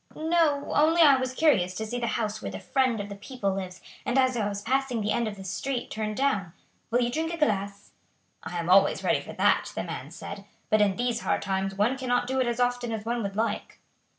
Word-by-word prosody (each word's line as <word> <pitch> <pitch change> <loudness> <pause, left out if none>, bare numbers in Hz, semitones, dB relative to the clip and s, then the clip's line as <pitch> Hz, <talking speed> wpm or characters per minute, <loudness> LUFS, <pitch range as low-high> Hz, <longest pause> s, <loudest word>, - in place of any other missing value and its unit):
"No; 315 -3 +1
only 325 +3 +5
I 280 -3 +7
was 255 0 -2
curious 185 - +3
to 220 - -3
see 240 +3 -3
the 235 - -1
house 215 -1 -2
where - - -4
the - - -6
friend 255 -4 +1
of 205 - -4
the 200 - -7
people 200 -1 -3
lives, 185 -1 -6 0.2
and 250 - 0
as 260 -1 +3
I 210 -3 0
was 200 0 -5
passing 260 0 0
the 210 0 -1
end 235 -1 +1
of 210 - -4
the 195 - -10
street 240 +7 -3
turned 215 -1 -3
down. 210 -11 0 0.4
Will 240 +2 +2
you 240 0 +1
drink 320 +5 -1
a 340 - -4
glass?" 200 -8 -1 0.5
"I 175 - -6
am 170 -1 -3
always 195 +2 +4
ready - - +2
for - - -9
that," - - +2
the - - -2
man - - -6
said, - - -8 0.3
"but 215 0 +5
in 200 -2 +3
these 240 0 -1
hard - - -1
times 195 0 -1
one 230 +7 +1
cannot 245 -2 +1
do 265 +1 -1
it 250 - +1
as 240 0 -1
often 245 -1 0
as 220 -1 -4
one 235 +1 -1
would 200 -2 -4
like." 220 0 -2
235 Hz, 240 wpm, -27 LUFS, 200-260 Hz, 0.5 s, I